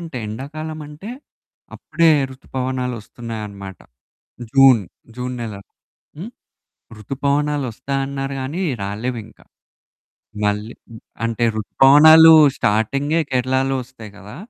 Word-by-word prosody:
అంటే 165 Hz, -6 st, -8 dB
ఎండాకాలం 155 Hz, +8 st, -7 dB
అంటే 150 Hz, +9 st, -10 dB, 0.6 s
అప్పుడే 165 Hz, -1 st, +1 dB, 0.2 s
రుతుపవనాలొస్తున్నాయన్నమాట. 115 Hz, -, -6 dB, 0.7 s
జూన్, 135 Hz, -4 st, +6 dB, 0.4 s
జూన్ 125 Hz, 0 st, -4 dB
నెల. 110 Hz, -3 st, -6 dB, 0.6 s
హ్మ్. 205 Hz, +8 st, -7 dB, 0.7 s
రుతుపవనాలొస్తాయన్నారు 135 Hz, +1 st, -3 dB
గానీ. 145 Hz, +8 st, -4 dB, 0.2 s
రాలేవింక. 110 Hz, +2 st, -6 dB, 1.1 s
మళ్ళీ 105 Hz, +3 st, -2 dB, 0.2 s
హ్మ్, 110 Hz, -, -12 dB, 0.2 s
అంటే 115 Hz, +1 st, -2 dB
రుతుపవనాలు 155 Hz, +8 st, +7 dB, 0.2 s
స్టార్టింగే 140 Hz, +10 st, 0 dB
కేరళలో 130 Hz, +1 st, 0 dB
వస్తాయి 115 Hz, -4 st, -13 dB
కదా! 100 Hz, +3 st, -12 dB
130 Hz, 85 wpm, -19 LUFS, 110-145 Hz, 1.1 s, రుతుపవనాలు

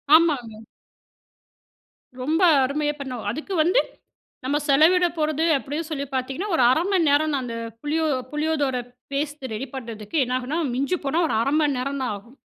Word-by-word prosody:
ஆமாங்க. 250 Hz, -10 st, +2 dB, 1.6 s
ரொம்ப 310 Hz, +7 st, 0 dB, 0.2 s
அருமையா 295 Hz, +3 st, 0 dB
பண்ணோம். 255 Hz, -4 st, -5 dB
அதுக்கு 310 Hz, -, -5 dB
வந்து, 360 Hz, +10 st, +3 dB, 0.7 s
நம்ம 285 Hz, +2 st, +1 dB
செலவிடப் 340 Hz, +4 st, +4 dB
போறது 310 Hz, +1 st, +1 dB
அப்டின்னு 295 Hz, +6 st, -4 dB
சொல்லி 280 Hz, -2 st, -2 dB
பார்த்தீங்கன்னா, 270 Hz, +10 st, -3 dB
ஒரு 255 Hz, -, +3 dB
1/2 320 Hz, +5 st, +2 dB
மணி 350 Hz, -5 st, +3 dB
நேரம் 295 Hz, +1 st, +2 dB
அந்த 235 Hz, -2 st, -5 dB, 0.3 s
புளியோ 315 Hz, +2 st, 0 dB, 0.3 s
புளியோதோர 300 Hz, -3 st, 0 dB, 0.4 s
பேஸ்ட்டு 280 Hz, -2 st, -3 dB
ரெடி 255 Hz, +5 st, -4 dB
பண்றதுக்கு 230 Hz, +1 st, -5 dB
என்னாகும்னா 255 Hz, +5 st, -2 dB, 0.2 s
மிஞ்சி 280 Hz, +8 st, 0 dB
போனா 310 Hz, +5 st, +1 dB
ஒரு -, -, -1 dB
1/2 275 Hz, +5 st, 0 dB
மணி 290 Hz, -3 st, +1 dB
நேரம் 275 Hz, +1 st, -3 dB
தான் 250 Hz, -4 st, -1 dB
ஆகும். 235 Hz, +7 st, -17 dB
285 Hz, 150 wpm, -24 LUFS, 255-315 Hz, 1.6 s, செலவிடப்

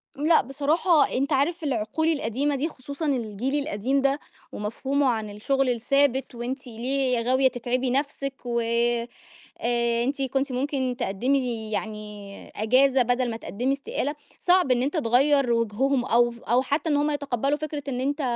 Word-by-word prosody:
لأ، 310 Hz, +3 st, +4 dB
بصراحة 295 Hz, +4 st, +2 dB
أنت 275 Hz, +3 st, 0 dB
عارف 320 Hz, +5 st, +1 dB
العقول 265 Hz, +3 st, -1 dB
القديمة 285 Hz, -1 st, 0 dB
دي 285 Hz, +4 st, -1 dB
خصوصًا 280 Hz, +2 st, -7 dB
الجيل 250 Hz, -1 st, -1 dB
القديم 260 Hz, +5 st, 0 dB
ده، 275 Hz, +1 st, +1 dB, 0.3 s
ومفهومه 265 Hz, +7 st, -1 dB
عن 220 Hz, -4 st, -1 dB
الشُّغل 265 Hz, +6 st, 0 dB
الثابت، 265 Hz, +2 st, +1 dB
وأنتِ 255 Hz, +3 st, -5 dB
ليه 250 Hz, +2 st, 0 dB
غاوية 260 Hz, +3 st, +3 dB
تتعبي 250 Hz, +1 st, -1 dB
نفْسِك 275 Hz, 0 st, -2 dB
وآآ 235 Hz, 0 st, 0 dB, 0.5 s
آآ 235 Hz, 0 st, +1 dB
أنتِ 275 Hz, +2 st, -2 dB
كُنتِ 270 Hz, +1 st, 0 dB
ممكن 260 Hz, -1 st, -1 dB
تقدمي 240 Hz, +1 st, -1 dB
يعني 210 Hz, -2 st, -6 dB
إجازة 255 Hz, +5 st, +3 dB
بدل 245 Hz, +1 st, +1 dB
ما 225 Hz, -, -4 dB
تقدمي 245 Hz, +4 st, -2 dB
استقالة، 280 Hz, +1 st, -3 dB, 0.2 s
صعب 360 Hz, -6 st, +3 dB
إن 245 Hz, -1 st, +3 dB
أنت 290 Hz, +5 st, -1 dB
تغيّر 275 Hz, 0 st, +3 dB
وجههم 240 Hz, +4 st, +1 dB
أو 240 Hz, 0 st, +3 dB
ف 235 Hz, 0 st, -13 dB
أو 245 Hz, +3 st, +2 dB
حتّى 285 Hz, +5 st, -1 dB
إن 295 Hz, -, +2 dB
هُم 295 Hz, +1 st, +1 dB
يتقبلوا 285 Hz, -1 st, -1 dB
فكرة 300 Hz, -1 st, -5 dB
إن 255 Hz, -2 st, -2 dB
أنت 285 Hz, +3 st, -1 dB
260 Hz, 155 wpm, -25 LUFS, 235-280 Hz, 0.5 s, لأ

